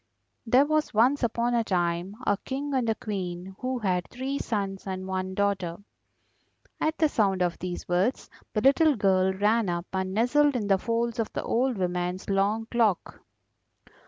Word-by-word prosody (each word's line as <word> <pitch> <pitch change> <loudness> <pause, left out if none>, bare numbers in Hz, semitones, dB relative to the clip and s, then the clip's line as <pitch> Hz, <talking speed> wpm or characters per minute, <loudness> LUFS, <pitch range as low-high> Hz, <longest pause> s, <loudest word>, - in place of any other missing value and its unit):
There 255 +5 +5
was 310 -5 0
once 250 +6 +4
upon 235 0 0
a 235 -1 +2
time 175 0 -1
a 205 - +3
King 275 +5 -4
and 250 -4 +1
a 220 - +1
Queen 190 -3 -5
who 255 0 -2
had 185 -6 -1
three 265 +3 -4
sons 195 -3 -3
and 185 0 -4
one 190 0 -3
daughter." 190 -4 0 1.0
At 315 +1 0
the 315 - +4
sound 195 -9 +1
of 175 -1 -2
these 180 0 -5
words 185 +8 0 0.2
the 215 - -1
little 280 +4 +5
girl 190 -3 +3
ran 210 +2 +1
up 175 0 -2
and 190 0 -1
nestled 280 +5 +3
in 225 -4 -1
the 195 -1 +3
folds 230 +2 -1
of 225 - -1
the - - -3
old 250 0 0
woman's 180 +1 -2
long 205 +3 +1
cloak. 225 -6 0
205 Hz, 170 wpm, -27 LUFS, 185-245 Hz, 1.0 s, There